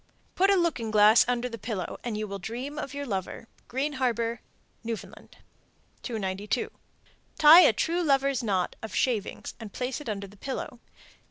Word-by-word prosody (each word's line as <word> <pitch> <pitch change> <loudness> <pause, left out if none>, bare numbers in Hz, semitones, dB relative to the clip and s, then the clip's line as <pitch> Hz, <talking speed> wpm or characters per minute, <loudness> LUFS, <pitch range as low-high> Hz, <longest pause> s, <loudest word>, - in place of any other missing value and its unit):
Put 390 +2 +3
a 400 - +5
looking 325 - 0
glass 215 +1 +6
under 245 0 0
the 230 -2 -8
pillow, 205 -4 -4
and 235 -3 -3
you 215 0 -3
will 200 0 -6
dream 250 +10 -5
of 280 -2 -6
your 285 0 -4
lover. 195 0 -4 0.2
Green 275 +4 -2
Harbor, 235 -3 -1 0.4
N.F. 230 -1 -3 1.0
292. 210 - -3 0.7
Tie 315 +3 +10
a - - +7
true 335 +10 -1
lover's 275 -4 +2
knot 195 -6 -1
(of 220 - -7
shavings) 225 -6 -1
and 220 -3 -8
place 255 +6 -4
it 290 - -6
under 200 -1 -3
the 200 +1 -15
pillow. 255 0 -5
235 Hz, 165 wpm, -27 LUFS, 210-275 Hz, 1.0 s, Tie